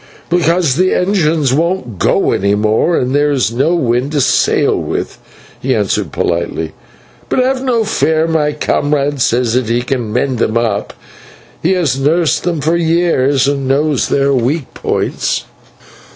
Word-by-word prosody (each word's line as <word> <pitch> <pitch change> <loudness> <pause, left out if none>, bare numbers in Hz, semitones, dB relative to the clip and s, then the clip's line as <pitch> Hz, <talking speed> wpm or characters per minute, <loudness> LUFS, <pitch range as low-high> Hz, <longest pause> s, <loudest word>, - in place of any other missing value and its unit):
"Because 170 -4 +2
the 185 +1 +2
engines 165 -8 +1
won't 155 - -1
go - - +2
any 100 +2 +1
more, 110 +11 +1
and 125 +1 -1
there 145 +1 +2
is 130 -6 0
no 140 +9 +1
wind 130 -1 0
to 145 - +1
sail - - +2
with," - - -4 0.4
he - - 0
answered - - -1
politely. 85 -2 -2 0.6
"But - - -1
have 260 +1 +1
no 240 -4 +1
fear, 160 -7 +1
my 160 -2 +1
comrade 145 -1 -1
says 120 -1 +1
that 125 -2 0
he 120 +1 0
can 125 -4 -3
mend 125 +1 -1
them 115 0 0
up. 110 -4 -1 0.7
He 175 +4 +2
has 155 -8 0
nursed 160 +5 +1
them 170 -4 -1
for 160 +4 +1
years 160 -6 +1
and 140 -2 -1
knows 145 0 +1
their 140 0 +2
weak 130 +4 -1
points." - - -2
145 Hz, 155 wpm, -14 LUFS, 125-165 Hz, 0.7 s, Because